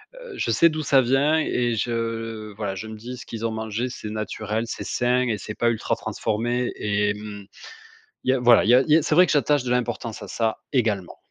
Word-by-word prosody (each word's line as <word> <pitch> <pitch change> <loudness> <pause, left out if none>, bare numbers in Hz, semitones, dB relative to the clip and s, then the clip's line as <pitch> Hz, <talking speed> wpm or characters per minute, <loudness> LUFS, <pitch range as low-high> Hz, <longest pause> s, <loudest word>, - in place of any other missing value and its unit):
heu, - - -10
je - - -1
sais 165 +9 +5
d'où 155 0 -3
ça 140 -2 +4
vient 135 +5 +3
et 120 -6 0
je, 115 -2 -3
voilà, 100 -2 -3
je 110 +4 -6
me 110 - -7
dis: 120 +4 -7
«Ce - - -11
qu'ils 115 0 -5
ont 115 - 0
mangé, 110 +3 -3
c'est 110 -3 -7
naturel, 110 +1 -3
c'est - - -5
sain 125 +1 +1
et 110 -3 0
c'est 105 +2 -7
pas 120 - +2
ultra 115 - -1
transformé» 120 +3 -2
et 105 0 +1
mmh, 105 -1 -8 0.8
il 130 - +1
y - - +5
a, 130 - +2
voilà, 120 -2 +6
il 115 - +2
y - - +8
a 130 - +6
il 155 - -6
y 155 - +7
a 160 - +3
c'est 155 0 0
vrai 180 0 +7
que - - 0
j'attache 145 -2 +2
de 125 - -3
l'importance 120 -2 -2
à - - -8
ça 115 -1 -1
également. 105 -8 0
115 Hz, 245 wpm, -24 LUFS, 110-125 Hz, 0.8 s, y